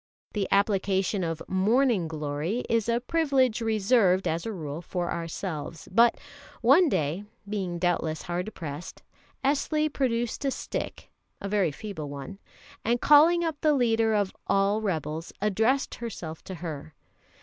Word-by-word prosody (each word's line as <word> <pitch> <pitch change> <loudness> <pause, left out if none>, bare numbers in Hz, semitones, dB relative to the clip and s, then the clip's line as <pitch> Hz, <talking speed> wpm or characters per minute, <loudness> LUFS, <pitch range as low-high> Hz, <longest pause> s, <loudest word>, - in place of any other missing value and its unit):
The 205 -3 -1
application 195 -1 +1
of 165 -2 -3
"morning 210 0 +2
glory" 155 +8 -3
is 230 -1 +1
a 235 0 +2
privilege 265 -5 +2
reserved, 215 -3 +3
as 165 +5 -1
a - - -2
rule, 155 -5 -5
for 175 0 -3
ourselves; 165 -2 -5
but 235 0 +5 0.4
one 290 +9 +6
day, 155 - -1 0.2
being 190 -4 -3
doubtless 170 -3 0
hard 180 +4 -3
pressed, 150 0 -7 0.4
Esli 300 +2 +1
produced 240 -1 -1
a 275 - +2
stick - - -5 0.3
a 200 - -5
very 200 -4 +2
feeble 160 -3 -6
one 140 +7 -8 0.4
and 240 +2 +1
calling 320 +5 +6
up 320 -3 -3
the 305 -2 +4
leader 225 -3 +2
of 200 -2 0
all 200 +2 +2
rebels, 160 -4 -3
addressed 220 +6 +1
herself 175 -9 -6
to 190 - -6
her. 155 -3 -7
200 Hz, 140 wpm, -27 LUFS, 170-235 Hz, 0.4 s, one